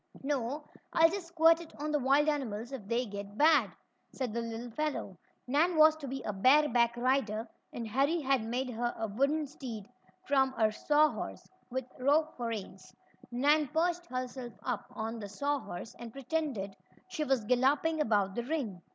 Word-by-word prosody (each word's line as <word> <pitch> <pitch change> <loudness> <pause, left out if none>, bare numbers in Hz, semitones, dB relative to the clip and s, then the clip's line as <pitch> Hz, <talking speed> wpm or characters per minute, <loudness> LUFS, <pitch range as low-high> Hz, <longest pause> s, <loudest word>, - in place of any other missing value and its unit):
"No, 280 +1 -2 0.3
I'll 325 0 +6
just 380 -2 -4
squirt 330 0 +4
it 330 - -13
on 300 +1 -2
the 295 - +2
wild 275 +3 +3
animals 245 -6 -2
if 240 -8 -7
they 240 +3 0
get 200 -1 -7
bad," 295 -8 +5 0.4
said 255 -5 -3
the 235 - -1
little 230 +1 -5
fellow. 275 - -3 0.3
Nan 315 +7 +2
was 310 0 +7
to 290 -3 -7
be 265 -1 -5
a 210 - -3
bare 265 +10 +5
back 235 0 +2
rider, 240 -3 0 0.2
and 230 -2 -5
Harry 275 +9 +1
had 270 -5 +1
made 250 +3 -2
her 240 +1 -2
a 225 - -2
wooden 280 +9 +1
steed 240 -7 -8 0.4
from 265 -1 +2
a 220 -1 +3
saw 300 +7 +3
horse, - - -7 0.2
with 260 0 -3
rope 300 +4 +2
for 240 -2 -3
reins. 195 -4 -6 0.4
Nan 290 +5 +3
perched 345 +4 0
herself 255 -1 -5
up 250 -4 -3
on 225 0 -4
the 205 -2 -7
saw 285 +8 -1
horse, 180 -1 -8
and 235 -1 -8
pretended 270 -7 -3 0.3
she 310 - -2
was 265 -6 +1
galloping 275 +7 +2
about 205 -7 +2
the 240 - -2
ring. 240 - -3
260 Hz, 180 wpm, -31 LUFS, 225-300 Hz, 0.4 s, was